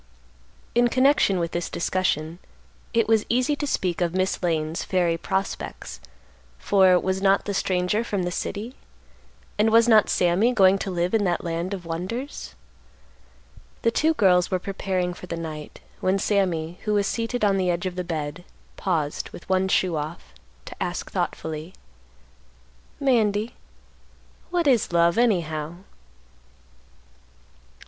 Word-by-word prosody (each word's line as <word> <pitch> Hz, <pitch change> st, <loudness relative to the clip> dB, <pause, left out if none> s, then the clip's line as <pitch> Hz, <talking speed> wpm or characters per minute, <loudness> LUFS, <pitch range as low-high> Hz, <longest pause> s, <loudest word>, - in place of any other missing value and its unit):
In 240 Hz, +1 st, +4 dB
connection 255 Hz, -5 st, +3 dB
with 170 Hz, -1 st, -2 dB
this 175 Hz, 0 st, -3 dB
discussion, 170 Hz, -2 st, -1 dB, 0.5 s
it 230 Hz, -1 st, +2 dB
was 220 Hz, -1 st, +3 dB
easy 255 Hz, +5 st, +2 dB
to 290 Hz, 0 st, -3 dB
speak 180 Hz, -9 st, -1 dB
of 175 Hz, 0 st, 0 dB
Miss 185 Hz, 0 st, 0 dB
Lane's 160 Hz, -1 st, -1 dB
fairy 175 Hz, -3 st, +1 dB
prospects, 190 Hz, +3 st, -4 dB, 0.6 s
for, 185 Hz, -, +4 dB
was 190 Hz, +1 st, -1 dB
not 195 Hz, 0 st, +3 dB
the 205 Hz, -, -2 dB
stranger 185 Hz, +3 st, 0 dB
from 200 Hz, -5 st, -2 dB
the 175 Hz, -, -2 dB
city? 215 Hz, +7 st, -4 dB, 0.9 s
and 215 Hz, +1 st, +4 dB
was 230 Hz, +1 st, +5 dB
not 220 Hz, -3 st, +5 dB
Sammy 185 Hz, +8 st, +2 dB
going 195 Hz, -3 st, +5 dB
to 195 Hz, -, -3 dB
live 175 Hz, +1 st, -1 dB
in 220 Hz, -2 st, +3 dB
that 175 Hz, -2 st, 0 dB
land 170 Hz, +2 st, -3 dB
of 190 Hz, -3 st, -5 dB
wonders? 180 Hz, -, -5 dB, 1.3 s
The 230 Hz, -, +3 dB
two 315 Hz, +6 st, +2 dB
girls 180 Hz, -6 st, +4 dB
were 185 Hz, -, +1 dB
preparing 185 Hz, -1 st, -2 dB
for 180 Hz, -, -11 dB
the 170 Hz, -, -4 dB
night, 155 Hz, -2 st, -7 dB, 0.2 s
when 190 Hz, +1 st, +1 dB
Sammy, 180 Hz, -5 st, 0 dB
who 210 Hz, -1 st, +1 dB
was 200 Hz, -1 st, +2 dB
seated 230 Hz, +1 st, -1 dB
on 195 Hz, -1 st, +3 dB
the 185 Hz, -1 st, +1 dB
edge 175 Hz, +1 st, -1 dB
of 185 Hz, -, -2 dB
the 180 Hz, -, -2 dB
bed, 155 Hz, -1 st, -4 dB, 0.3 s
paused, 160 Hz, -6 st, -1 dB
with -, -, -12 dB
one 190 Hz, 0 st, +2 dB
shoe 185 Hz, -2 st, +1 dB
off, 150 Hz, -, -6 dB, 0.3 s
to -, -, -9 dB
ask -, -, -3 dB
thoughtfully, 160 Hz, +3 st, -4 dB, 1.2 s
"Mandy, 225 Hz, -4 st, +1 dB, 1.0 s
what 350 Hz, -1 st, 0 dB
is 250 Hz, -10 st, +3 dB
love, 170 Hz, +3 st, +3 dB
anyhow?" 165 Hz, -8 st, 0 dB
185 Hz, 145 wpm, -24 LUFS, 170-215 Hz, 1.3 s, was